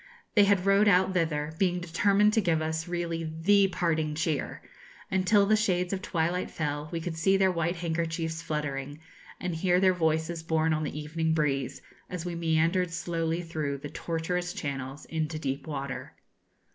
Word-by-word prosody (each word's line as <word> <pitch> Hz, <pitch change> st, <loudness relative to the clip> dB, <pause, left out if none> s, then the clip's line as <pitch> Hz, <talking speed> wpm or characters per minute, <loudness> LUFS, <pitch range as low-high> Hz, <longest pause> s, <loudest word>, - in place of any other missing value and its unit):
They 205 Hz, -2 st, +6 dB
had 195 Hz, -2 st, +2 dB
rowed 200 Hz, +2 st, +5 dB
out 190 Hz, -1 st, +4 dB
thither, 160 Hz, -3 st, 0 dB
being 180 Hz, -2 st, +2 dB
determined 200 Hz, +5 st, +3 dB
to 220 Hz, -, +3 dB
give 165 Hz, -4 st, +2 dB
us 160 Hz, +1 st, -2 dB
really 170 Hz, -1 st, -2 dB, 0.2 s
the 200 Hz, +3 st, +5 dB
parting 160 Hz, -4 st, 0 dB
cheer, 155 Hz, -2 st, -2 dB, 0.5 s
and 185 Hz, -1 st, +1 dB
till 205 Hz, 0 st, +5 dB
the 215 Hz, +2 st, +4 dB
shades 180 Hz, -4 st, +1 dB
of 190 Hz, -, -2 dB
twilight 175 Hz, 0 st, -1 dB
fell 150 Hz, -1 st, -3 dB
we 170 Hz, -, -2 dB
could 165 Hz, 0 st, -4 dB
see 190 Hz, +4 st, +3 dB
their 190 Hz, -1 st, +4 dB
white 170 Hz, 0 st, -1 dB
handkerchiefs 165 Hz, -1 st, -2 dB
fluttering, 145 Hz, -2 st, -3 dB, 0.4 s
and 180 Hz, -1 st, -3 dB
hear 180 Hz, +2 st, +2 dB
their 185 Hz, 0 st, +4 dB
voices 160 Hz, -1 st, 0 dB
borne 160 Hz, 0 st, +1 dB
on 155 Hz, -, 0 dB
the 150 Hz, -, -4 dB
evening 160 Hz, +1 st, -1 dB
breeze, 140 Hz, -4 st, -1 dB, 0.3 s
as 180 Hz, -2 st, -5 dB
we 175 Hz, -, -3 dB
meandered 165 Hz, +2 st, +1 dB
slowly 165 Hz, 0 st, -2 dB
through 155 Hz, -4 st, -3 dB
the 145 Hz, +2 st, -7 dB
tortuous 175 Hz, +3 st, -2 dB
channels 135 Hz, 0 st, -5 dB
into 160 Hz, -1 st, -2 dB
deep 140 Hz, 0 st, -3 dB
water. 140 Hz, -3 st, -5 dB
165 Hz, 170 wpm, -28 LUFS, 155-180 Hz, 0.5 s, They